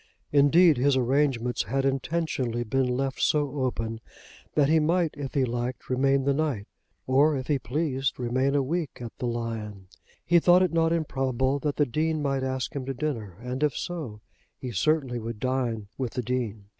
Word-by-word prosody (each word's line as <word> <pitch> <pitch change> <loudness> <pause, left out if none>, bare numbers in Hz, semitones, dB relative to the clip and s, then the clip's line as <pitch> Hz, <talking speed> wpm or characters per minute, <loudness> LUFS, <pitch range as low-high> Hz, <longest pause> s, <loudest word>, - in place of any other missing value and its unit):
Indeed 150 +2 +5
his 135 +2 +3
arrangements 125 -2 +1
had 135 +6 -1
intentionally 135 -3 -1
been 130 +3 0
left 135 +2 -2
so 145 -2 +1
open 115 -3 -2 0.5
that 145 -2 +4
he 160 +2 +4
might 165 +1 +1
if 140 -2 -6
he 135 -2 +3
liked 120 +2 -4
remain 135 +1 +2
the 140 +1 +2
night, 135 -9 -1 0.4
or 140 +3 +3
if 130 - -4
he 145 -1 +1
pleased, 135 0 -1
remain 130 +3 +1
a 140 - +3
week 155 0 -3
at 120 -2 -7
the 125 - -2
"Lion." 110 -5 -4 0.4
He 175 +1 +5
thought 180 +2 +5
it 180 -3 0
not 165 0 +3
improbable 135 -4 0
that 145 0 -2
the 145 - +3
Dean 155 +5 0
might 135 -2 0
ask 130 0 -3
him 140 - -2
to 135 - -3
dinner, 115 - -4
and, 125 +2 -4
if 150 -3 +1
so, 145 -12 -5 0.4
he 125 - -6
certainly 130 - +1
would 115 -1 -6
dine 120 -4 -1
with 130 -3 -2
the 125 - -2
Dean. 110 -4 -3
135 Hz, 180 wpm, -27 LUFS, 120-150 Hz, 0.5 s, Indeed